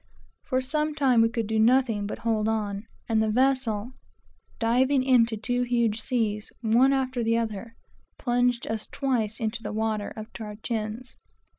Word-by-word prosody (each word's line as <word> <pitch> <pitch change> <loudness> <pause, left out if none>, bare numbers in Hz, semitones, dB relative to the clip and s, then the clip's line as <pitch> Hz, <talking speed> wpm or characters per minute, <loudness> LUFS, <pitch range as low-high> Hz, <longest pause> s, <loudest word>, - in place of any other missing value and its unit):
For 260 -1 -1
some 300 +3 -1
time 260 -6 +4
we 225 - +4
could 230 -1 -2
do 220 +1 0
nothing 225 -3 +3
but - - -5
hold 220 -2 0
on, 210 -1 -2 0.2
and 220 -1 +2
the 220 - +1
vessel 250 -2 +1 0.7
diving 255 +3 +2
into 240 -4 +3
two 245 +3 -1
huge 235 -3 +1
seas, 215 -4 -1
one 240 +4 +4
after 260 -3 0
the 230 0 +2
other, 230 0 -4 0.4
plunged 245 -1 +1
us 220 -1 -4
twice 235 -6 -1
into 225 0 -2
the - - -5
water 215 -1 -1
up 215 +1 -8
to 230 - -7
our 210 -1 -7
chins. 225 +3 -4
230 Hz, 165 wpm, -26 LUFS, 220-255 Hz, 0.7 s, time